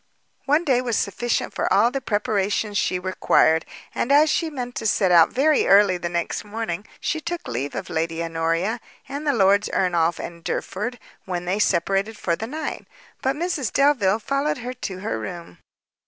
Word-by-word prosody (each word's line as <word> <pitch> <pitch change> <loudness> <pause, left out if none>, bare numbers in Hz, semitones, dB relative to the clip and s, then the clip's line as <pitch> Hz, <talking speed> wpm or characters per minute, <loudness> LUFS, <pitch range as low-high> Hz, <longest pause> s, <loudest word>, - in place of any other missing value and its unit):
One 300 +5 +2
day 255 -3 +3
was 240 -3 -1
sufficient 240 +4 -1
for - - -1
all 225 +5 +4
the 275 - -3
preparations 205 -2 0
she 180 - 0
required, 180 -3 +2 0.3
and, 250 - -1
as 300 +2 +6
she 330 - 0
meant 250 -5 -5
to 225 - -1
set 190 -3 +2
out 170 -2 +7
very 295 +4 +2
early 195 -2 +5
the 175 - -3
next 170 0 -2
morning, 210 -2 -4
she 320 - -2
took 340 +1 -5
leave 130 +4 -3
of - - -4
Lady 165 0 -2
Honoria, 165 +7 -1 0.3
and 285 +2 -5
the 290 - +3
Lords 200 -2 +3
Ernolf 170 -2 +1
and 170 -1 -8
Derford, 220 +9 -3 0.3
when 180 -2 -3
they 190 +4 -1
separated 195 +3 +1
for 170 - 0
the 225 - -5
night; 305 +4 -5 0.3
but 265 +1 0
Mrs 305 -7 -2
Delvile 250 -9 +3
followed 275 +6 -1
her 250 +1 -5
to 190 -6 -6
her 220 - -2
room. 170 - -8
210 Hz, 180 wpm, -23 LUFS, 180-260 Hz, 0.3 s, out